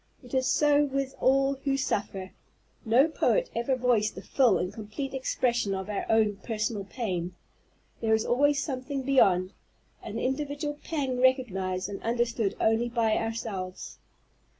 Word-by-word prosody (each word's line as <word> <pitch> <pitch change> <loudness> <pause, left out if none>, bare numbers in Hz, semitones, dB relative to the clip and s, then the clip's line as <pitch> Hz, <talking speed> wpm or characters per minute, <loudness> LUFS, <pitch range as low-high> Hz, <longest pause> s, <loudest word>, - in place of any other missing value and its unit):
It 245 - -14
is 260 0 +2
so 295 0 +4
with 275 -1 -2
all 270 +1 +3
who 275 -1 +1
suffer. 195 -7 -2 0.5
No 245 +7 +4
poet - - +1
ever 240 +3 +1
voiced 240 -4 +1
the - - -8
full 245 -9 +3
and 180 +1 -3
complete 225 +6 -6
expression 240 -5 0
of 190 +1 -5
our 205 - -3
own 215 -2 +3
personal 215 -1 -3
pain. 180 -6 -3 0.6
There 220 -1 +3
is 220 - -1
always 285 +3 +2
something 270 -1 -4
beyond, 190 -9 +3 0.5
an - - -6
individual 290 +2 -2
pang 270 -6 -2
recognized 195 -9 +1
and 200 -1 -7
understood 230 -3 0
only 225 +2 +2
by 230 -2 +1
ourselves. 220 -5 -4
240 Hz, 145 wpm, -28 LUFS, 210-270 Hz, 0.6 s, so